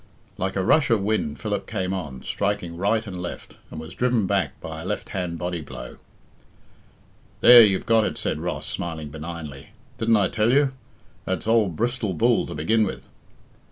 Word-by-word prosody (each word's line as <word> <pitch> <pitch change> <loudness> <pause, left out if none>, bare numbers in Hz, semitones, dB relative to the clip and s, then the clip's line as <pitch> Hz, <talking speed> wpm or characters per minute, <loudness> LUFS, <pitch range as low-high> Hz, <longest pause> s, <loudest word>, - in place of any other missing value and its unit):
Like 95 +1 -3
a 95 - 0
rush 155 +10 +4
of 110 -4 +2
wind 100 -8 -1
Philip 105 -2 -3
came 95 -4 -2
on, 75 -9 -5
striking 100 -4 -2
right 105 +5 +1
and 90 -4 -6
left, 90 - -7
and 80 - -7
was 80 +1 -8
driven 120 -3 +1
back 100 -1 -1
by - - -7
a - - -8
left - - -3
hand 90 -3 -3
body 90 -1 -3
blow. - - -9 1.4
"There, 120 -1 +10
you've 100 -4 +3
got 115 -2 +4
it," - - -3
said - - -2
Ross, - - -3
smiling 80 -3 -4
benignly. 75 -3 -8 0.3
"Didn't 115 0 +3
I 100 -2 +2
tell 110 +1 +2
you? 140 0 +4 0.5
That's 95 - -2
old 110 -6 +2
Bristol 120 -3 -1
Bull 75 - +2
to - - -6
begin 110 +10 +2
with." 100 - -4
95 Hz, 180 wpm, -24 LUFS, 85-110 Hz, 1.4 s, There